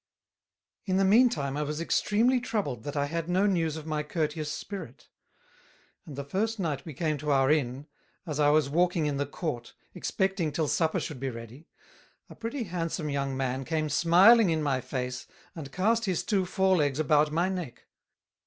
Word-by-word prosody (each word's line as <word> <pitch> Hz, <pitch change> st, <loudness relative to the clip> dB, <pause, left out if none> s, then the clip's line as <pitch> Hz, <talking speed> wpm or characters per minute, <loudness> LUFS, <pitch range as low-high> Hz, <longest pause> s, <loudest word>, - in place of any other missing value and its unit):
In 185 Hz, 0 st, +1 dB
the 195 Hz, -, +3 dB
mean 235 Hz, +6 st, +6 dB
time 140 Hz, -, -3 dB
I 150 Hz, -, -1 dB
was 150 Hz, +1 st, -3 dB
extreamly 225 Hz, +9 st, +2 dB
troubled 200 Hz, -, -3 dB
that 145 Hz, 0 st, -4 dB
I 140 Hz, -, +1 dB
had 165 Hz, +3 st, -3 dB
no 185 Hz, +3 st, +2 dB
news 165 Hz, -6 st, +1 dB
of 155 Hz, -, -8 dB
my 155 Hz, -1 st, -1 dB
courteous 150 Hz, 0 st, -2 dB
Spirit; 200 Hz, +5 st, -8 dB, 1.0 s
and 145 Hz, -, -8 dB
the 140 Hz, -, -4 dB
first 210 Hz, +10 st, -1 dB
night 150 Hz, -7 st, -2 dB
we 155 Hz, -5 st, -8 dB
came 155 Hz, 0 st, -1 dB
to 150 Hz, +1 st, -4 dB
our 135 Hz, -1 st, +3 dB
Inn, 140 Hz, -2 st, 0 dB, 0.4 s
as 150 Hz, -3 st, -4 dB
I 145 Hz, -1 st, +5 dB
was 150 Hz, -1 st, +3 dB
walking 175 Hz, +2 st, +1 dB
in 145 Hz, -2 st, -1 dB
the 145 Hz, 0 st, -1 dB
Court, 145 Hz, -6 st, -5 dB, 0.2 s
expecting 190 Hz, -5 st, -1 dB
till 155 Hz, +1 st, -1 dB
Supper 160 Hz, +2 st, +1 dB
should 150 Hz, -5 st, -6 dB
be 135 Hz, +1 st, -2 dB
ready, 115 Hz, +5 st, -10 dB, 0.6 s
a -, -, -10 dB
pretty 235 Hz, +3 st, -4 dB
handsome 165 Hz, -4 st, -3 dB
young 140 Hz, -1 st, -2 dB
Man 130 Hz, 0 st, -2 dB
came 155 Hz, +1 st, -1 dB
smiling 185 Hz, -, +6 dB
in 160 Hz, -2 st, 0 dB
my 135 Hz, -3 st, 0 dB
Face 125 Hz, -1 st, -4 dB, 0.3 s
and 145 Hz, -5 st, -8 dB
cast 225 Hz, +6 st, +1 dB
his 185 Hz, -4 st, -1 dB
Two 195 Hz, -3 st, 0 dB
Fore 190 Hz, 0 st, +2 dB
Legs 145 Hz, -3 st, +1 dB
about 150 Hz, 0 st, +3 dB
my 170 Hz, +4 st, +1 dB
Neck. 180 Hz, -9 st, -5 dB
155 Hz, 190 wpm, -28 LUFS, 140-185 Hz, 1.0 s, mean